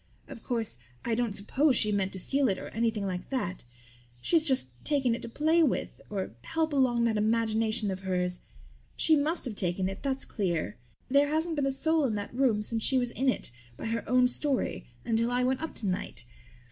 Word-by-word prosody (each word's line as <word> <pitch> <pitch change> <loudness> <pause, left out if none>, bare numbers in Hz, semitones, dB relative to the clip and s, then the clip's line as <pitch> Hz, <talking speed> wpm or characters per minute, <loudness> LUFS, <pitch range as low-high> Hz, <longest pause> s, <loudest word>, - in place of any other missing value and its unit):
"Of 230 - -9
course, 225 - -2 0.3
I 235 - 0
don't 230 -3 0
suppose 260 +8 +2
she 215 -2 +4
meant 195 -2 0
to 190 - -5
steal 275 +6 +2
it 190 - 0
or - - -7
anything 225 -2 0
like 180 -2 -4
that. 185 - -2 0.5
She's 320 - +3
just 130 - -1
taken 275 -5 +2
it 230 - -3
to - - -6
play 315 +7 +3
with 295 -6 0
or 195 -2 -3
help 320 -1 -1
along 250 -4 +3
that 225 -2 +2
imagination 220 0 +2
of 190 - -4
hers. 180 -1 -1 0.6
She 320 - +5
must 305 +3 0
have 235 -4 -4
taken 185 0 +1
it, 195 +1 -5
that's 270 -1 -2
clear, 175 - -1 0.3
for 255 - -9
there 285 +1 +5
hasn't 320 +2 0
been 285 -2 +1
a - - +2
soul 315 +2 +1
in 225 -5 0
that 205 +1 -4
room 240 -5 +2
since 225 +1 -2
she 265 - +2
was 245 -1 0
in 265 +2 +1
it, 250 - -1 0.3
by - - -6
her 225 -1 -1
own 250 0 +5
story, 275 +2 -1 0.2
until 230 0 +1
I 245 +1 +1
went 260 +2 +1
up 320 - -5
tonight. 185 - -2
235 Hz, 210 wpm, -29 LUFS, 205-270 Hz, 0.6 s, She